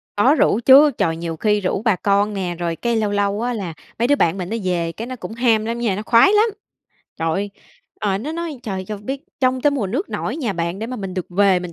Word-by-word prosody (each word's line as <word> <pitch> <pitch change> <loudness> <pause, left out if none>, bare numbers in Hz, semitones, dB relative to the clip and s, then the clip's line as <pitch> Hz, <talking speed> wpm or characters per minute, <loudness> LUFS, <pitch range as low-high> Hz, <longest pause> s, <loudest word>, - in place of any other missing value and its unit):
Có 255 +9 +4
rủ 220 - +3
chứ. 285 +3 +8
Trời, 165 -1 +1
nhiều 165 -1 -4
khi 210 +1 +1
rủ 190 +2 -1
bà 220 -4 +2
con 200 +2 +1
nè, 180 -3 -3
rồi 170 -1 -2
cái 235 +6 -1
lâu 215 -2 0
lâu 205 +1 0
á, 245 +1 -1
là 190 -7 -4 0.3
mấy 240 - +2
đứa 285 - +4
bạn 175 -8 +1
mình 180 0 -4
nó 230 - -2
về, 175 -2 -1
cái 225 +7 -7
nó 255 - -5
cũng 225 - -8
ham 225 -2 +2
lắm 235 +1 -3
nha, 225 -5 0
nó 205 - -4
khoái 235 - +5
lắm! 430 +2 +4 0.7
Trời 165 - 0
ơi, 200 +4 -2 0.5
ờ, 195 -2 0
nó 290 +8 -5
nói: 330 -4 -5
"Trời, 190 -3 -4
cho 210 +2 -5
biết 260 +7 -5 0.2
trông 255 -1 +2
tới 290 - +3
mùa 265 -9 -1
nước 270 - -3
nổi - - -3
nhà 245 -10 -2
bạn 170 +1 -3
để 225 - -4
mà 255 - -5
mình 195 -4 -6
được 185 -2 -3
về, 190 0 +3
mình 180 -1 -7
210 Hz, 265 wpm, -20 LUFS, 185-245 Hz, 0.7 s, chứ